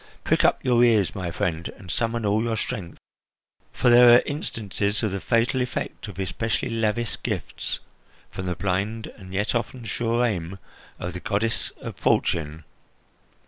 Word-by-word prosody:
Prick -, -, +2 dB
up -, -, +2 dB
your 120 Hz, -1 st, +5 dB
ears, 110 Hz, -6 st, +4 dB
my 90 Hz, -3 st, -3 dB
friend, 85 Hz, -2 st, -2 dB
and 90 Hz, -2 st, -8 dB
summon 115 Hz, +1 st, -1 dB
all 105 Hz, +2 st, +2 dB
your 115 Hz, -1 st, -1 dB
strength, 90 Hz, -5 st, -4 dB, 0.7 s
for 125 Hz, -, +3 dB
there 120 Hz, 0 st, +9 dB
are 120 Hz, -, +5 dB
instances 105 Hz, -, -2 dB
of 110 Hz, -, +1 dB
the 100 Hz, -, -2 dB
fatal 115 Hz, +4 st, +1 dB
effect 125 Hz, -2 st, -4 dB
of 100 Hz, -, -9 dB
especially 110 Hz, +5 st, -2 dB
lavish 115 Hz, 0 st, -1 dB
gifts -, -, -3 dB, 0.5 s
from 95 Hz, -, -5 dB
the 90 Hz, -, -1 dB
blind 100 Hz, +5 st, -1 dB
and 95 Hz, -3 st, -11 dB
yet 100 Hz, +2 st, 0 dB
often 120 Hz, 0 st, -3 dB
sure 115 Hz, +3 st, +1 dB
aim 95 Hz, -4 st, -2 dB, 0.4 s
of 90 Hz, 0 st, -5 dB
the 90 Hz, -, -5 dB
goddess 110 Hz, +4 st, 0 dB
of -, -, -6 dB
Fortune. 80 Hz, -1 st, +1 dB
105 Hz, 160 wpm, -25 LUFS, 95-115 Hz, 0.7 s, there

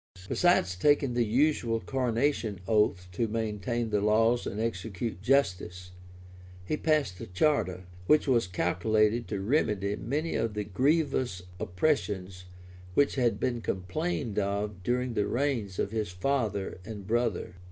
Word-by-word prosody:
Besides 175 Hz, -, +3 dB
taking 140 Hz, +5 st, +3 dB
the 120 Hz, 0 st, +2 dB
usual 120 Hz, -2 st, +2 dB
coronation 120 Hz, -4 st, 0 dB
oath 105 Hz, -4 st, +2 dB
to 115 Hz, +6 st, -1 dB
maintain 110 Hz, +1 st, -2 dB
the 105 Hz, -1 st, +2 dB
laws 115 Hz, +3 st, +3 dB
and 105 Hz, -, -4 dB
execute 105 Hz, -2 st, -3 dB
justice, 90 Hz, -8 st, 0 dB, 0.7 s
he 155 Hz, -, 0 dB
passed 150 Hz, -, 0 dB
a -, -, -6 dB
charter, 95 Hz, -3 st, +1 dB, 0.2 s
which 150 Hz, 0 st, +4 dB
was 120 Hz, -7 st, +3 dB
calculated 105 Hz, +6 st, +1 dB
to 100 Hz, -, -3 dB
remedy 105 Hz, -3 st, +1 dB
many 145 Hz, +11 st, -2 dB
of 110 Hz, -2 st, -1 dB
the 105 Hz, -, -1 dB
grievous 130 Hz, -, 0 dB, 0.2 s
oppressions 95 Hz, -, -1 dB, 0.5 s
which 145 Hz, -, +4 dB
had 120 Hz, -6 st, +1 dB
been 120 Hz, 0 st, -1 dB
complained 115 Hz, -, -2 dB
of 100 Hz, -1 st, -2 dB
during 125 Hz, +3 st, -1 dB
the 105 Hz, -2 st, 0 dB
reigns 120 Hz, -8 st, -1 dB
of 100 Hz, -, -1 dB
his 110 Hz, -3 st, -2 dB
father 100 Hz, 0 st, -1 dB
and 105 Hz, -1 st, -8 dB
brother. 110 Hz, -5 st, -1 dB
110 Hz, 135 wpm, -29 LUFS, 95-125 Hz, 0.7 s, which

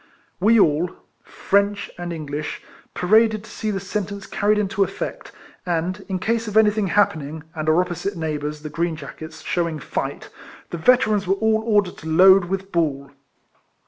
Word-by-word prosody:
We 220 Hz, +4 st, +5 dB
all, 160 Hz, 0 st, +3 dB, 0.3 s
French 200 Hz, +1 st, 0 dB
and 175 Hz, 0 st, -5 dB
English, 150 Hz, -2 st, -5 dB, 0.3 s
paraded 215 Hz, +3 st, +3 dB
to -, -, -13 dB
see 215 Hz, -, -3 dB
the 195 Hz, -2 st, -1 dB
sentence 200 Hz, 0 st, -4 dB
carried 210 Hz, +1 st, +1 dB
into 205 Hz, 0 st, +1 dB
effect, -, -, -5 dB, 0.3 s
and, 180 Hz, +2 st, -2 dB
in 190 Hz, -, -1 dB
case 225 Hz, +4 st, -1 dB
of 210 Hz, 0 st, -1 dB
anything 210 Hz, -1 st, +4 dB
happening, 160 Hz, -6 st, 0 dB
and 155 Hz, -2 st, -2 dB
our 160 Hz, +2 st, +4 dB
opposite 180 Hz, +2 st, -4 dB
neighbours, 150 Hz, -1 st, -3 dB
the 155 Hz, -, -5 dB
green 165 Hz, +2 st, -1 dB
jackets, 155 Hz, +2 st, -9 dB
shewing 170 Hz, -3 st, -1 dB
fight, 150 Hz, -, -4 dB, 0.4 s
the 170 Hz, -, -3 dB
Veterans 215 Hz, -1 st, +3 dB
were 195 Hz, -, +3 dB
all 220 Hz, +1 st, +1 dB
ordered 205 Hz, -4 st, +2 dB
to 160 Hz, -, -9 dB
load 190 Hz, +3 st, +6 dB
with 195 Hz, +2 st, -4 dB
ball. 140 Hz, -5 st, -1 dB
185 Hz, 160 wpm, -22 LUFS, 160-205 Hz, 0.4 s, load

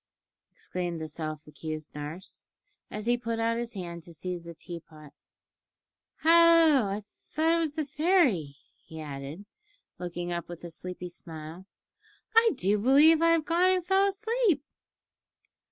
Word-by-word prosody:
exclaimed 175 Hz, -2 st, -4 dB
the 160 Hz, -, -4 dB
self 155 Hz, 0 st, -6 dB
accused 155 Hz, 0 st, -7 dB
nurse, 150 Hz, +5 st, -8 dB, 0.4 s
as 210 Hz, 0 st, -6 dB
he 240 Hz, +1 st, +3 dB
put 230 Hz, -1 st, -3 dB
out 230 Hz, +1 st, 0 dB
his 240 Hz, 0 st, -4 dB
hand 170 Hz, -3 st, -6 dB
to 170 Hz, 0 st, -14 dB
seize 180 Hz, +2 st, -4 dB
the 170 Hz, 0 st, -10 dB
tea 170 Hz, +1 st, -8 dB
pot. 155 Hz, -3 st, -16 dB, 1.1 s
"Hallo! 330 Hz, -6 st, +6 dB
I 205 Hz, +2 st, -3 dB, 0.2 s
thought 320 Hz, +2 st, +1 dB
it 335 Hz, -, +2 dB
was 310 Hz, -3 st, -1 dB
the 310 Hz, -2 st, -1 dB
fairy," 275 Hz, -, +2 dB, 0.3 s
he 160 Hz, -, -10 dB
added, 145 Hz, +5 st, -7 dB, 0.5 s
looking 175 Hz, 0 st, -4 dB
up 170 Hz, 0 st, -4 dB
with 175 Hz, -1 st, -9 dB
a 170 Hz, -, -7 dB
sleepy 180 Hz, +1 st, -7 dB
smile; 165 Hz, +1 st, -9 dB, 0.7 s
"I 455 Hz, 0 st, +7 dB
do 205 Hz, -3 st, +1 dB
believe 290 Hz, +8 st, +6 dB
I've 330 Hz, -2 st, +4 dB
gone 345 Hz, +3 st, +3 dB
and 370 Hz, -2 st, +1 dB
fell 385 Hz, +2 st, +3 dB
asleep." 410 Hz, -, +1 dB
195 Hz, 150 wpm, -28 LUFS, -, 1.1 s, I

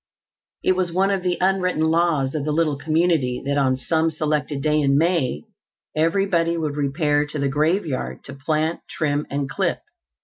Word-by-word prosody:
It -, -, +3 dB
was 180 Hz, -2 st, -1 dB
one 190 Hz, +3 st, +2 dB
of 195 Hz, -2 st, 0 dB
the 180 Hz, -1 st, 0 dB
unwritten 180 Hz, -4 st, +1 dB
laws 160 Hz, -5 st, +1 dB
of 155 Hz, -3 st, -2 dB
the 150 Hz, -, -1 dB
little 155 Hz, -1 st, +1 dB
community 155 Hz, -4 st, +1 dB
that 140 Hz, +1 st, +1 dB
on 130 Hz, -2 st, +2 dB
some 160 Hz, +5 st, +1 dB
selected 150 Hz, -2 st, -2 dB
day 150 Hz, 0 st, +2 dB
in 140 Hz, -1 st, +3 dB
May 155 Hz, -, +1 dB, 0.5 s
everybody 170 Hz, +1 st, +1 dB
would 155 Hz, -3 st, -2 dB
repair 145 Hz, +1 st, +1 dB
to 150 Hz, -, -5 dB
the 140 Hz, -1 st, 0 dB
graveyard 155 Hz, 0 st, -1 dB
to 140 Hz, -, -8 dB
plant, 155 Hz, +4 st, -1 dB
trim 145 Hz, -1 st, -1 dB
and 140 Hz, 0 st, -2 dB
clip. 175 Hz, +5 st, -1 dB
155 Hz, 170 wpm, -22 LUFS, 145-170 Hz, 0.5 s, It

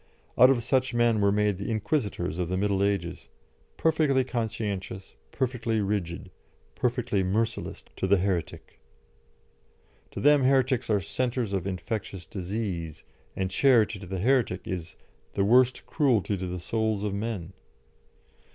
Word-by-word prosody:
Out 125 Hz, +1 st, +7 dB
of 125 Hz, -3 st, +2 dB
such 130 Hz, 0 st, +1 dB
men 120 Hz, -2 st, +3 dB
were 100 Hz, 0 st, +4 dB
made 105 Hz, -2 st, +1 dB
the 100 Hz, -, -4 dB
Inquisitors 105 Hz, -, -1 dB
of 90 Hz, -2 st, -1 dB
the 95 Hz, -, -1 dB
Middle 100 Hz, 0 st, +1 dB
Ages, 95 Hz, -4 st, -2 dB, 0.5 s
perfectly 150 Hz, -5 st, +2 dB
conscientious, 105 Hz, -6 st, -4 dB, 0.2 s
perfectly 120 Hz, -3 st, -1 dB
rigid, 95 Hz, -3 st, -2 dB, 0.4 s
perfectly 120 Hz, -5 st, 0 dB
merciless 110 Hz, +5 st, -2 dB
to 95 Hz, -, -1 dB
the 100 Hz, +1 st, +5 dB
heretic. 90 Hz, -3 st, -3 dB, 1.3 s
To -, -, -7 dB
them 145 Hz, -1 st, +5 dB
heretics 130 Hz, -2 st, +2 dB
are 105 Hz, -2 st, +2 dB
centres 120 Hz, +1 st, -2 dB
of 95 Hz, -1 st, -1 dB
infectious 95 Hz, -1 st, -4 dB
disease, 90 Hz, -5 st, -4 dB, 0.3 s
and 95 Hz, 0 st, -2 dB
charity 115 Hz, -2 st, +3 dB
to 100 Hz, -, -9 dB
the 95 Hz, +1 st, -4 dB
heretic 120 Hz, -5 st, +2 dB
is 90 Hz, -3 st, -5 dB, 0.4 s
"the 100 Hz, -, +1 dB
worst 125 Hz, +3 st, +4 dB
cruelty 120 Hz, -, +1 dB
to 95 Hz, -1 st, -4 dB
the 90 Hz, 0 st, -4 dB
souls 110 Hz, +2 st, -1 dB
of 105 Hz, -2 st, -1 dB
men." 100 Hz, -4 st, -4 dB
105 Hz, 140 wpm, -27 LUFS, 95-120 Hz, 1.3 s, Out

